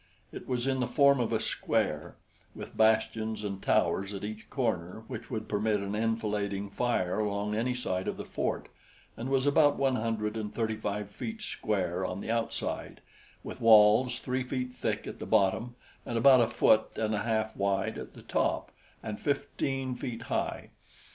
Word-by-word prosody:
It - - -9
was 125 -1 -1
in 135 -1 +1
the 125 - 0
form 140 0 +5
of 120 -2 0
a 110 - +2
square, 110 - -1 0.4
with - - -9
bastions 110 0 +2
and 100 -2 -4
towers 100 +1 +1
at 100 - -6
each 110 +1 -6
corner 110 -5 -2
which 115 -2 -7
would 110 -3 -4
permit 105 0 +1
an 100 +1 -4
enfilading 105 -3 -1
fire 110 -6 0
along 105 0 -1
any 120 +4 0
side 95 -7 -2
of - - -2
the - - -6
fort, - - -2 0.5
and 120 +3 -5
was 135 0 +2
about 145 0 +4
one 135 -2 +2
hundred 110 -1 -1
and 105 -2 -4
thirty 110 -1 -1
five 105 -1 -4
feet 220 - -6
square 95 - -1
on 90 +1 -3
the 110 - -3
outside, 115 0 -3 0.4
with - - -8
walls 115 +2 +6
three 130 0 -2
feet 125 0 -3
thick - - -2
at - - -7
the - - -6
bottom 110 +3 +2 0.3
and 120 - -3
about 130 +1 +7
a 115 - +3
foot 110 -1 +3
and 110 -1 0
a 105 - 0
half 110 -1 -1
wide 100 0 0
at - - -9
the - - -12
top, - - 0 0.3
and 105 -1 -5
fifteen 135 -2 -1
feet 125 -2 -5
high. - - -3
110 Hz, 180 wpm, -30 LUFS, 105-125 Hz, 0.5 s, about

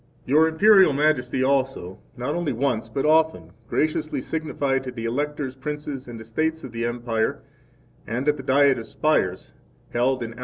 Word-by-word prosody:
15 130 - -3
Your 160 +1 +6
Imperial 190 0 +6
Majesty 135 -3 +1
also, 130 -8 -1 0.2
not 125 +4 -2
only 170 -3 -1
once 115 -3 -1
but 135 +6 -2
often, 155 - +2 0.2
graciously 155 0 0
signified 145 -4 -2
to 130 - -5
the 115 -2 -6
Electors 145 +2 -2
Princes, 145 -1 -6
and 120 -2 -8
Estates 155 +9 -2
of 130 - -8
the 115 0 -3
Empire, 120 -2 -2 0.6
and 125 +6 -3
at 150 - +4
the 135 - -7
Diet 135 0 +3
of 115 - -8
Spires 95 -13 0 0.4
held 125 +1 +1
A.D. 115 0 -6
135 Hz, 165 wpm, -24 LUFS, 120-150 Hz, 0.6 s, Your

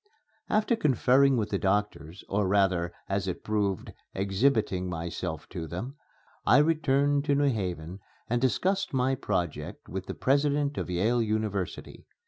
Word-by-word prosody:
After 215 +2 +2
conferring 135 - +3
with 110 -2 -1
the - - 0
doctors, 100 -3 -1
or 100 0 0
rather 95 -3 +2 0.2
as 100 -1 -1
it 90 - -4
proved 105 -3 -1 0.2
exhibiting 100 -2 +1
myself 85 -1 -4
to 85 -3 -5
them, 115 - -5 0.5
I 125 - +5
returned 145 -2 +2
to 145 -2 +2
New 140 -1 +3
Haven 90 -3 -4 0.3
and 120 +1 0
discussed 185 - 0
my 130 +1 +2
project 95 - -3
with 95 0 -5
the - - -5
President 145 +1 +1
of - - -4
Yale 110 +7 +1
University. 105 -4 -3
110 Hz, 140 wpm, -28 LUFS, 95-140 Hz, 0.5 s, I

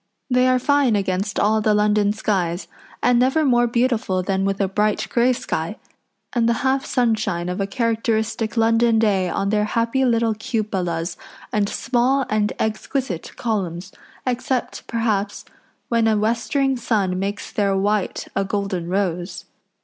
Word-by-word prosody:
They 250 +1 +4
are 255 0 +4
fine 275 -2 +3
against 195 0 -1
all 215 +1 +3
the 215 0 +3
London 210 0 +3
skies, 190 -5 -1 0.4
and 245 -1 +4
never 265 +5 +3
more 240 -2 +4
beautiful 235 -6 0
than 195 0 0
with 195 0 -1
a 195 - +2
bright 210 +2 0
grey 240 +1 +3
sky, 250 - -3 0.6
and 235 -2 +2
the 235 +3 -1
half 265 +1 +1
sunshine 215 -8 0
of 180 +2 -2
a 195 - -1
characteristic 225 -1 -1
London 225 0 +3
day 200 -5 +2
on 195 +3 -1
their 210 -1 +2
happy 230 +4 0
little 230 -2 +2
cupolas 195 -6 -2 0.4
and 205 -1 +1
small 255 +3 +1
and 210 -1 +1
exquisite 220 - -3
columns, 190 -5 -2 0.3
except, 255 0 -2
perhaps, 215 -3 -1 0.4
when 230 -1 +2
a 220 -1 +3
westering 235 +5 +1
sun 200 -6 0
makes 200 +2 -4
their 200 -2 +1
white 205 0 -1
a 195 - +1
golden 195 -3 -2
rose. 180 -1 -2
215 Hz, 150 wpm, -21 LUFS, 195-235 Hz, 0.6 s, They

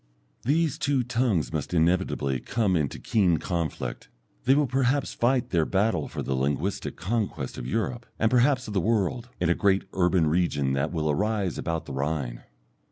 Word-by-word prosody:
These 155 +2 +1
two 140 -3 +1
tongues 115 - 0
must 80 +3 -2
inevitably 80 -6 +1
come 100 - 0
into 75 -5 -1
keen 90 -7 +2
conflict; 85 -1 -3 0.4
they 135 - +5
will 150 0 +3
perhaps 135 +1 +1
fight 125 +1 +1
their 85 -3 +3
battle 100 +7 +1
for - - -5
the 70 - -2
linguistic 70 +8 -1
conquest 95 - -2
of - - -5
Europe, 115 - -2
and 110 +1 +2
perhaps 130 +1 +3
of 105 - -5
the 95 - +1
world, 115 +4 0
in 85 -1 +2
a - - +5
great 95 +1 +2
urban 90 -2 +3
region 75 -4 +1
that 70 +3 0
will 80 -3 -1
arise 100 +2 -1
about 80 -1 -2
the - - -7
Rhine. 70 -3 -2
95 Hz, 170 wpm, -26 LUFS, 80-120 Hz, 0.4 s, they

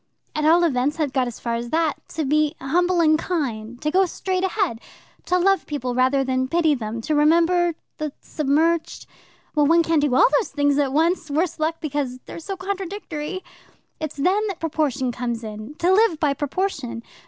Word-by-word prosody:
At 305 0 0
all 335 +3 +5
events, 290 -1 +1
I've 290 -4 0
got 260 -2 +1
as 240 - -7
far 235 - -3
as 235 +1 -3
that. 320 0 +1 0.2
To 315 -2 -1
be 305 +2 +2
humble 350 +6 +1
and 310 -1 +4
kind, 245 -10 -3
to 300 - 0
go 380 +2 +3
straight 370 +1 -2
ahead, 375 - -1 0.4
to 360 - +2
love 385 0 +2
people 255 -4 -3
rather 260 +2 +2
than 260 0 0
pity 325 +1 +2
them, 230 -3 -4
to 305 - -2
remember 335 +3 +3 0.2
the 305 -1 -2
submerged 315 +3 0 0.5
well, 295 -2 +3
one 335 +2 +5
can't 325 -2 +2
do 285 -4 +1
all - - +7
these - - -3
things 285 0 +1
at 275 -2 +1
once, 325 +2 +1
worse 325 +3 -1
luck, 315 +1 0
because 285 -4 -2
they're - - -8
so 385 +4 -6
contradictory. 375 -3 -5 0.6
It's 310 -2 -5
then 385 +9 +2
that 390 -4 -5
proportion 285 -5 -1
comes 235 -1 -4
in 215 +5 -8
to 350 +4 +2
live 400 -6 +3
by 295 -3 +2
proportion. 280 -5 -3
305 Hz, 190 wpm, -23 LUFS, 265-340 Hz, 0.6 s, all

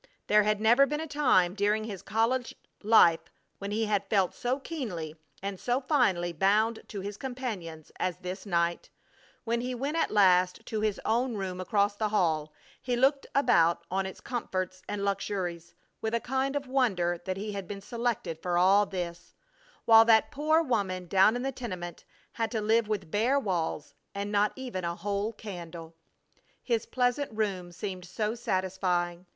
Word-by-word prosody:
There 210 0 +5
had 210 0 +1
never 240 +6 +5
been 295 +1 -2
a 320 - -3
time 265 - +3
during 210 +2 +1
his 205 -4 -6
college 235 +3 0 0.3
life 200 -6 +6 0.4
when 200 - -5
he 220 +2 0
had 205 -2 -1
felt 195 -4 +2
so 250 +2 -1
keenly 195 - -5 0.3
and 195 -1 -4
so 245 +1 0
finely 220 - +1
bound 215 +6 +2
to 200 - -6
his 200 +1 -6
companions 210 - -6
as 180 -1 -1
this 185 +1 -6
night; 170 -3 -1 0.5
when 235 0 -1
he 250 +1 -3
went 280 +6 -2
at 330 - +1
last 185 -3 +3
to 215 -1 -3
his 215 -2 0
own 235 +2 +1
room 185 -2 -4
across 205 +1 +1
the 215 0 -1
hall, 160 -7 +1 0.3
he 250 -1 -1
looked 275 +3 +2
about 170 -11 +3
on 190 +1 0
its 190 - -9
comforts 185 -6 -3
and 205 -1 -2
luxuries 180 -4 -3 0.3
with 220 +1 -1
a - - +2
kind 265 +3 -1
of 285 -1 -2
wonder 195 -10 +1
that 185 0 -2
he 210 +2 -4
had 200 -3 -5
been 200 -1 -6
selected 230 -6 -3
for 175 -1 0
all 195 +3 +5
this, 175 -3 -6 0.5
while 225 -1 +8
that 225 -1 +4
poor 310 +3 +2
woman 195 - -1
down 195 +5 +4
in 245 - -3
the 270 - -1
tenement 185 -9 -7 0.3
had 225 -1 -2
to 225 - -2
live 220 +1 +2
with 200 -7 -3
bare 240 +7 +2
walls 175 - -2 0.2
and 200 +1 -3
not 210 0 +3
even 250 -8 -5
a 170 0 -2
whole 200 +4 -2
candle! 170 -6 -9 0.7
His 230 -2 -1
pleasant 250 +3 0
room 195 -5 -2
seemed 185 0 -6
so 210 +4 -2
satisfying! 185 -5 -1
205 Hz, 175 wpm, -29 LUFS, 185-235 Hz, 0.7 s, while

